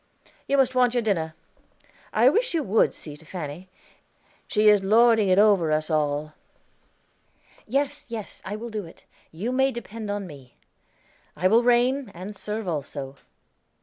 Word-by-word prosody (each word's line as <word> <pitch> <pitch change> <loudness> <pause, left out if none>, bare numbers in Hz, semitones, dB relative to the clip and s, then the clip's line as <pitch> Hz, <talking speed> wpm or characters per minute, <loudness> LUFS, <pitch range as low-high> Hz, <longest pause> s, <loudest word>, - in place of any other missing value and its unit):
You 280 - +2
must 260 -2 +3
want 250 -1 +3
your 240 - +1
dinner. 165 -7 -1 0.8
I 230 +3 +4
wish 445 - +2
you 320 - +1
would 215 0 +2
see 150 -2 -7
to 150 - -17
Fanny; 165 +1 -7 0.8
she 215 -1 +2
is 205 -2 +6
lording 220 0 +4
it 185 - +4
over 200 -6 +4
us 155 +1 0
all." 150 0 -1 1.3
"Yes, 280 +4 -1
yes, 225 -3 -7
I 205 - -5
will 235 +2 -6
do 215 -1 -4
it; 165 - -17 0.3
you 200 +10 -4
may 265 +1 +2
depend 230 -3 -7
on 205 -1 -3
me. 140 -7 -13 0.8
I 185 - +2
will 225 +5 +5
reign, 245 +1 +2
and 190 +4 -8
serve 210 +1 -5
also." 140 -4 -5
210 Hz, 155 wpm, -25 LUFS, 165-240 Hz, 1.3 s, is